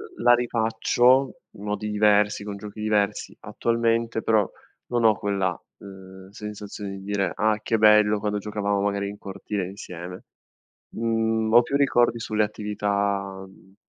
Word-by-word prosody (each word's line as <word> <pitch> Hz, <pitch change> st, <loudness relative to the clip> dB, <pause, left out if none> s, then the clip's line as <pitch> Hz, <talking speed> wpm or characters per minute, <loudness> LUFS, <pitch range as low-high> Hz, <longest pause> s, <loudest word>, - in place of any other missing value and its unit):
L -, -, -10 dB
la 120 Hz, +1 st, +6 dB
rifaccio 120 Hz, +2 st, +2 dB, 0.2 s
in 100 Hz, -, -12 dB
modi 105 Hz, 0 st, -3 dB
diversi, 105 Hz, -1 st, +3 dB
con 100 Hz, -1 st, -6 dB
giochi 105 Hz, +1 st, -9 dB
diversi 105 Hz, -1 st, 0 dB
attualmente, 115 Hz, -1 st, 0 dB
però, 110 Hz, -3 st, +2 dB, 0.4 s
non 120 Hz, -1 st, +1 dB
ho 110 Hz, -2 st, +5 dB
quella, 95 Hz, -3 st, -1 dB, 0.2 s
uhm, 95 Hz, -1 st, -12 dB
sensazione 105 Hz, -1 st, -7 dB
di -, -, -10 dB
dire: 100 Hz, 0 st, -1 dB
"Ah 110 Hz, 0 st, +1 dB
che 115 Hz, 0 st, 0 dB
bello 105 Hz, 0 st, +5 dB
quando 105 Hz, 0 st, -2 dB
giocavamo 100 Hz, -1 st, -2 dB
magari 100 Hz, 0 st, -1 dB
in 100 Hz, -, -9 dB
cortile 100 Hz, 0 st, -5 dB
insieme!" 90 Hz, -2 st, -9 dB, 0.7 s
Mhmm, 115 Hz, -1 st, 0 dB
ho 120 Hz, -, +9 dB
più 135 Hz, +3 st, -2 dB
ricordi 120 Hz, -4 st, +3 dB
sulle 110 Hz, -1 st, 0 dB
attività, 100 Hz, -2 st, -2 dB
mhmm, 95 Hz, 0 st, -20 dB
105 Hz, 145 wpm, -24 LUFS, 100-110 Hz, 0.7 s, ho